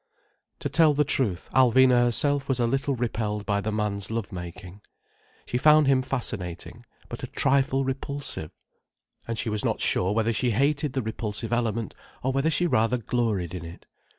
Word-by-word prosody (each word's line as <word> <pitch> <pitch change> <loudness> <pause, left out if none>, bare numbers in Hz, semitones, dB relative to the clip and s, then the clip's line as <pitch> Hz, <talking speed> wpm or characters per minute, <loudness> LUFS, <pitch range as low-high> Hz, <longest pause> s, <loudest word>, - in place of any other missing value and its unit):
To - - -1
tell 160 -3 +4
the 150 - +3
truth, 110 -10 -1
Alvina 130 -1 +5
herself 140 +3 +1
was 130 -2 0
a 120 - +2
little 135 +3 0
repelled 110 -3 -2
by 100 0 0
the 110 - -2
man's 105 -2 -2
love 115 -2 -3
making. 90 +2 -8 0.6
She 125 - -2
found 150 +2 +6
him 135 -1 +3
fascinating, 110 -4 -5 0.2
but - - -7
a - - -4
trifle 135 0 +1
repulsive. 135 - -4 0.8
And 115 -1 -3
she - - -2
was 105 -1 -1
not - - 0
sure 90 +2 +1
whether 115 +2 +1
she 120 +3 0
hated 140 +4 +1
the 130 - -1
repulsive 110 0 -4
element, 115 -3 -1 0.3
or 130 - +1
whether 135 +4 +1
she 175 +2 +1
rather 115 -5 +2
gloried 110 -7 -1
in 90 -3 -5
it. 85 +1 -11
120 Hz, 175 wpm, -26 LUFS, 105-135 Hz, 0.8 s, found